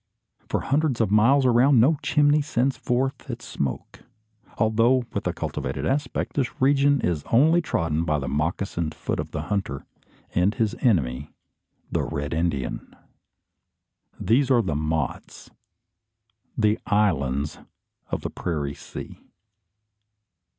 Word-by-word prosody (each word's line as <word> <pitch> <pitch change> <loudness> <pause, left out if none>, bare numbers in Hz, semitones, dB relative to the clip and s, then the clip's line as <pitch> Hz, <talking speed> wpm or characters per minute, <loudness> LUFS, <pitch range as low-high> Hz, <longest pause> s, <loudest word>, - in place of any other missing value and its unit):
For - - 0
hundreds 145 -2 0
of 110 -4 +1
miles 125 +6 +4
around 125 +2 +5
no 140 +6 +4
chimney 150 0 +3
sends 135 -2 0
forth 130 +2 -2
its - - -6
smoke. 70 -3 -4 0.6
Although 115 +3 +3
with - - -2
a - - +1
cultivated 65 +3 -4
aspect, 140 +3 -1
this 135 -4 -2
region 140 +1 +3
is 80 -4 -1
only 160 +9 +5
trodden 85 - -1
by 75 -2 0
the 70 -3 -4
moccasined 80 +2 -2
foot - - -3
of - - -3
the - - -4
hunter, 95 -10 -3 0.5
and 95 +4 +2
his 110 -1 0
enemy, 70 - +1 0.6
the - - +1
Red 70 0 -3
Indian. 80 -5 -2 1.2
These 125 +7 +2
are 120 -3 +4
the 85 - -2
mottes 75 -1 -3 1.1
the 105 -1 +2
"islands" 75 -9 +1 0.5
of - - -3
the - - -4
prairie 75 -5 -3
sea. - - -9
105 Hz, 130 wpm, -24 LUFS, -, 1.2 s, around